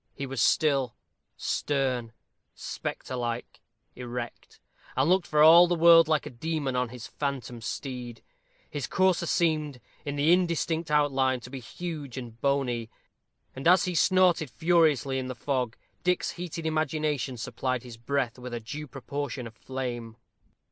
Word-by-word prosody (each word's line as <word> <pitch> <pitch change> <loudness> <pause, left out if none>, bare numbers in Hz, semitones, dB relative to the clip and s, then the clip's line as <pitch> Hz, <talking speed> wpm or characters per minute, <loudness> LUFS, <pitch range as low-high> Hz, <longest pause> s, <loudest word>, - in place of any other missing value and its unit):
He 140 - -4
was 135 -3 -3
still, 135 -5 +2 0.4
stern, 130 -5 -1 0.4
spectre 130 - -5
like, 120 -1 -4 0.3
erect; 120 -1 -7 0.4
and 135 +3 +3
looked 185 0 +3
for 150 0 +4
all 170 +3 +9
the 175 - +1
world 165 -1 +7
like 155 -2 +1
a 150 - -6
demon 145 +1 -2
on 125 -1 0
his 125 0 -9
phantom 135 -4 -4
steed. 125 -2 -6 0.4
His 145 -3 -4
courser 185 -2 +2
seemed, 155 -6 +1 0.2
in 145 -1 -3
the 150 +4 +4
indistinct 170 -2 0
outline, 135 -3 +2
to 125 - -11
be 135 - -5
huge 145 0 -6
and 120 -3 -8
bony, 125 -5 0 0.7
and, 135 +4 -2
as 185 +3 +6
he 180 - -2
snorted 180 -3 +3
furiously 155 -5 +2
in 130 - -4
the 130 - -5
fog, 125 -1 -2 0.3
Dick's 180 0 +1
heated 170 -2 -6
imagination 155 -4 -1
supplied 130 +2 -2
his 120 -2 -10
breath 125 0 -2
with 125 -1 -6
a - - -3
due 145 +7 -7
proportion 140 0 -5
of 115 - -9
flame. 120 -2 -5
140 Hz, 150 wpm, -28 LUFS, 125-160 Hz, 0.7 s, all